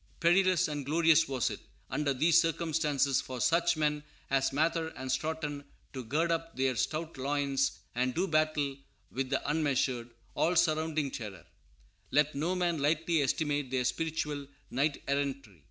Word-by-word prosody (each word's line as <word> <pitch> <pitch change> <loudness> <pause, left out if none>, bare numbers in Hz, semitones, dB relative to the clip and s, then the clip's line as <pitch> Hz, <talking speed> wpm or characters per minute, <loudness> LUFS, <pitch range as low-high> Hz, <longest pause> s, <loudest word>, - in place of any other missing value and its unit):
Perilous 185 0 +4
and 145 -2 -4
glorious 160 +2 +4
was 130 -3 0
it, - - -6 0.3
under 150 -2 0
these 160 +6 +4
circumstances, 150 -5 +1
for 130 -1 -7
such 170 +4 +2
men 150 -1 0 0.3
as 135 -1 +2
Mather 160 +3 +1
and 130 0 -4
Stoughton 150 +1 -2 0.3
to 130 -2 -5
gird 155 +8 0
up 165 0 -2
their 130 -1 +1
stout 155 +6 -2
loins 140 0 0 0.2
and 125 +1 0
do 185 +3 +1
battle 155 -4 +1 0.3
with 130 0 -2
the - - -1
unmeasured, 135 -5 0 0.2
all 175 +2 +1
surrounding 155 -3 +1
terror. 105 -6 -7 0.6
Let 150 +2 +2
no 165 +6 -1
man 175 -3 0
lightly 160 +2 +2
estimate 145 0 0
their 130 -1 0
spiritual 150 0 -2 0.2
knight 140 +3 0
errantry. 140 - -2
150 Hz, 150 wpm, -31 LUFS, 135-160 Hz, 0.6 s, Perilous